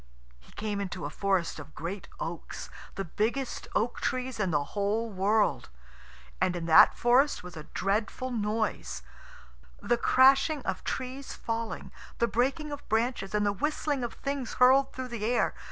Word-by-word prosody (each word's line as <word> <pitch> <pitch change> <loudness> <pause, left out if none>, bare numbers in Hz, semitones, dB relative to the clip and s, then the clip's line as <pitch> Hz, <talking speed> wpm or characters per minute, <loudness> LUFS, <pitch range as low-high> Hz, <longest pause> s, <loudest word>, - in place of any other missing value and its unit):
He 65 - -20
came 205 -1 -3
into 185 -4 -4
a 145 - -4
forest 190 -5 0
of 150 0 -11
great 180 +3 -5
oaks, 165 0 -6 0.2
the 195 - -3
biggest 235 - -2
oak 235 +3 0
trees 255 -2 -2
in 200 -3 +1
the 150 -3 +1
whole 215 +3 0
world. 205 +3 +1 0.7
And 180 - +2
in 170 -1 -3
that 160 - +7
forest 255 +2 +3
was 180 -1 -9
a 155 -2 -8
dreadful 215 +6 -1
noise 210 - -2 0.8
the 240 - +1
crashing 270 +4 +5
of 190 - -3
trees 260 +1 -4
falling, 230 0 -4 0.3
the 235 - +3
breaking 275 +6 0
of 290 0 -8
branches, 220 -3 0
and 210 0 +2
the 205 - +2
whistling 290 +3 -1
of 240 - -3
things 275 -3 -3
hurled 265 +2 +5
through 255 -1 -6
the 235 -3 -5
air. 240 +3 +2
220 Hz, 160 wpm, -29 LUFS, 195-255 Hz, 0.8 s, that